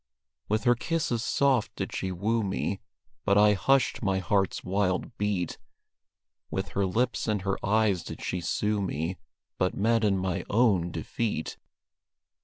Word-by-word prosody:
With 110 +1 +1
her 120 -1 +5
kisses 120 -3 -1
soft 135 -4 +2
did - - -4
she 95 - -2
woo 110 +6 0
me, 95 0 -2 0.4
But 100 - +3
I 105 0 +6
hushed 135 +6 +2
my 95 -4 +1
heart's 95 +1 0
wild 95 +3 -1
beat; 100 -4 -1 0.9
With - - -3
her 100 -1 0
lips 120 +7 0
and 105 -3 0
her 95 -1 -2
eyes 105 -3 +2
did - - -7
she 90 - -2
sue 105 +4 0
me, 90 -1 -2 0.4
But 90 - +1
met 115 +2 +2
in 100 -2 +3
my 95 -1 -1
own 100 -6 +3
defeat. 85 +2 -3
100 Hz, 150 wpm, -28 LUFS, 95-110 Hz, 0.9 s, I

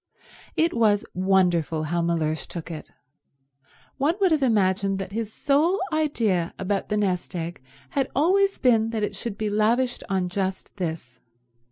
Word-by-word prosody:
It 330 +1 +2
was 215 -3 +3
wonderful 180 -4 +2
how 170 +3 -1
Mellersh 160 -3 -1
took 170 0 -7
it. 155 - -7 1.1
One 300 +5 +2
would 380 -3 +3
have 310 -2 +3
imagined 195 -5 +2
that 190 0 -5
his 220 0 -3
sole 300 - +2
idea 225 - 0
about 195 +1 -2
the 210 - 0
nest 185 -3 -1
egg 170 -3 -4 0.3
had 270 -2 0
always 390 +7 +3
been 225 -4 +3
that 225 -2 -2
it 205 - -2
should 210 0 -5
be 215 -1 -2
lavished 235 +4 +1
on 190 -2 0
just 190 +1 -3
this. 160 -9 -5
200 Hz, 155 wpm, -25 LUFS, 180-245 Hz, 1.1 s, was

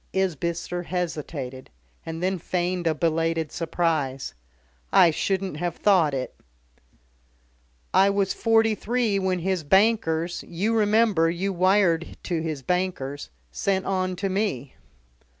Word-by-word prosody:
Isbister 175 -1 -1
hesitated, 155 -7 -4 0.4
and 165 +1 -5
then 190 0 0
feigned 175 0 -1
a 160 - +2
belated 165 -1 0
surprise. 160 -6 -1 0.6
"I 170 - +6
shouldn't 190 0 -2
have 175 +1 -2
thought 175 -8 +3
it." 130 -1 -4 1.6
"I 195 +1 +5
was 200 -1 +1
forty 225 -1 +3
three 225 -1 0
when 190 -1 0
his 180 -1 -1
bankers 175 -2 +2
you 205 +7 -1
remember 210 -5 +3
you 190 +4 -2
wired 185 -2 +2
to 170 -3 -2
his 155 -4 -4
bankers 175 - -2 0.2
sent 190 - -1
on 185 -1 -1
to 195 +2 -2
me." 190 - -2
180 Hz, 120 wpm, -25 LUFS, 160-195 Hz, 1.6 s, I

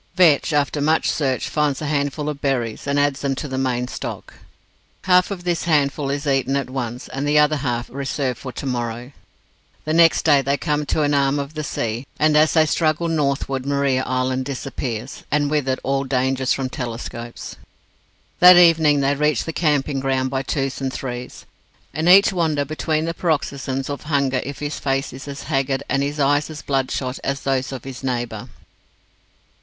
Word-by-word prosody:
Vetch, 165 -5 +4
after 145 0 0
much 155 +2 +2
search, 135 -4 -1
finds 150 -3 0
a 155 - -4
handful 145 0 -1
of 150 -2 -4
berries, 125 -4 -2
and 140 0 +1
adds 145 -1 +1
them 140 -1 -1
to 150 - -5
the 130 - -5
main 125 -2 -1
stock. - - -7 0.7
Half 180 0 +4
of 190 -3 -5
this 175 -2 -1
handful 145 -3 +1
is 140 +2 -2
eaten 135 -1 +1
at 135 -2 -2
once, 125 -2 -4
the 145 +2 +1
other 150 0 +4
half 120 -3 -2
reserved 135 -1 -3
for 130 - -6
"to 140 - -7
morrow". 120 0 -3 0.7
The 155 - -1
next 165 0 +5
day 145 -3 +5
they 140 +1 0
come 150 -2 -1
to 155 - +1
an 145 0 +1
arm 140 0 +2
of 140 +1 -4
the 155 -1 -4
sea, 120 -2 -3
and 155 0 +3
as 155 +1 +4
they 160 -1 +5
struggle 155 +1 +1
northward, 140 -4 -1
Maria 140 -2 +1
Island 130 0 -1
disappears, 130 -4 -5
and 145 0 +1
with 145 -3 0
it 130 - +1
all 135 0 0
danger 130 0 0
from 135 +1 +1
telescopes. 120 -1 -6 0.8
That 180 0 +9
evening 160 -4 +5
they 140 +1 +2
reach 150 -3 +1
the 165 - -5
camping 145 -4 +1
ground 130 -1 0
by 135 -1 -1
twos 135 0 -2
and 135 -1 -1
threes; 125 -1 -6 0.5
and 160 +3 0
each 195 +2 +7
wonders 155 -5 0
between 155 +1 -1
the 165 - -2
paroxysms 140 -5 -2
of 145 -1 -5
hunger 140 -4 +1
if 140 0 -6
his 145 0 -4
face 135 -1 -1
is 135 +3 -9
as 140 0 -7
haggard, 135 -2 -1
and 140 - 0
his 145 +2 -2
eyes 145 +2 +2
as 155 -2 -8
bloodshot, 135 -1 -2
as 140 0 -2
those 135 -1 -1
of 130 -3 -6
his 135 -1 -8
neighbour. 120 -4 -3
140 Hz, 185 wpm, -21 LUFS, 130-150 Hz, 0.8 s, That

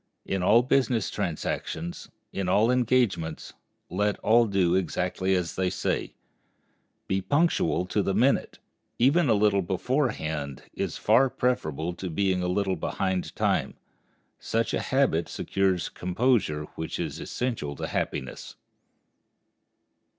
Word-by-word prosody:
In 95 -1 -1
all 115 +6 +5
business 125 -4 +1
transactions, 85 +2 -4 0.2
in 95 -2 -2
all 110 +6 +4
engagements, 120 -10 0 0.3
let 105 +3 0
all 115 +1 +4
do 95 -4 +2
exactly 95 +1 0
as 90 -2 -1
they 95 -1 +1
say,—be 95 +1 -5
punctual 95 - +1
to 100 +3 0
the 95 -1 -1
minute; 125 +6 +2 0.4
even 140 +5 +4
a 110 - +5
little 100 -1 +3
beforehand 85 - -2
is - - -3
far 135 +2 +4
preferable 90 - -1
to 90 +1 -6
being 95 +2 +1
a 90 - -1
little 95 +1 0
behind 95 +3 -2
time. - - 0 0.6
Such 115 0 -1
a - - +1
habit 130 - +1
secures 95 -3 0
a - - -10
composure 90 -5 +1
which 80 - -5
is - - -3
essential 115 - -3
to - - -4
happiness. 65 - -4
95 Hz, 125 wpm, -27 LUFS, 90-120 Hz, 0.6 s, all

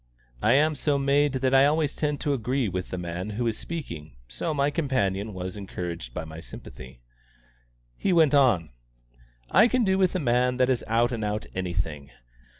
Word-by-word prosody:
I 115 - +4
am 155 +3 +4
so 145 0 0
made 140 +1 +2
that 130 0 0
I 135 +1 +6
always 150 -1 0
tend 150 -1 -1
to 145 - +1
agree 125 0 0
with 90 -1 -4
the 90 - -4
man 90 +3 -4
who 120 - 0
is 115 -2 0
speaking, 85 - -7
so - - -3
my 145 -1 +1
companion 110 - -1
was 95 0 -6
encouraged 90 -9 -6
by 80 +6 -5
my 80 +1 -9
sympathy. 65 -2 -11 0.9
He 195 - -1
went 160 -4 +4
on: 120 - +3 0.8
"I 210 +7 +6
can 250 0 +1
do 190 -2 +2
with 185 -1 +2
a - - +1
man 125 -2 +1
that 130 0 +3
is 125 - 0
out 115 +2 +2
and 115 -3 -3
out 105 +1 -2
anything. 85 -6 -3
120 Hz, 185 wpm, -26 LUFS, 90-145 Hz, 0.9 s, I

